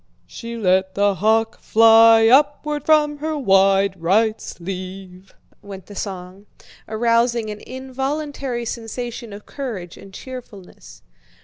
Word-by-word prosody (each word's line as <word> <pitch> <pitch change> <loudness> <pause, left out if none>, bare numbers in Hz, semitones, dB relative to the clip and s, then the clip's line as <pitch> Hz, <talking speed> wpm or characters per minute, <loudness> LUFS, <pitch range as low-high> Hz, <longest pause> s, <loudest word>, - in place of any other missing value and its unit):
"She 235 0 -8
let 190 -2 +1
the 200 0 +2
hawk 220 +3 0
fly 225 0 +6
upward 290 +3 +2
from 300 -1 +3
her 310 +1 -3
wide 195 - +2
right 215 +6 +1
sleeve," 185 +1 -9 0.3
went 195 -2 -10
the 205 - -12
song, 190 0 -7 0.4
arousing 230 0 0
an 210 - -8
involuntary 265 -1 -5
sensation 235 0 -6
of 205 +1 -11
courage 215 - -7
and 195 - -14
cheerfulness. 200 - -12
225 Hz, 115 wpm, -20 LUFS, 195-255 Hz, 0.4 s, fly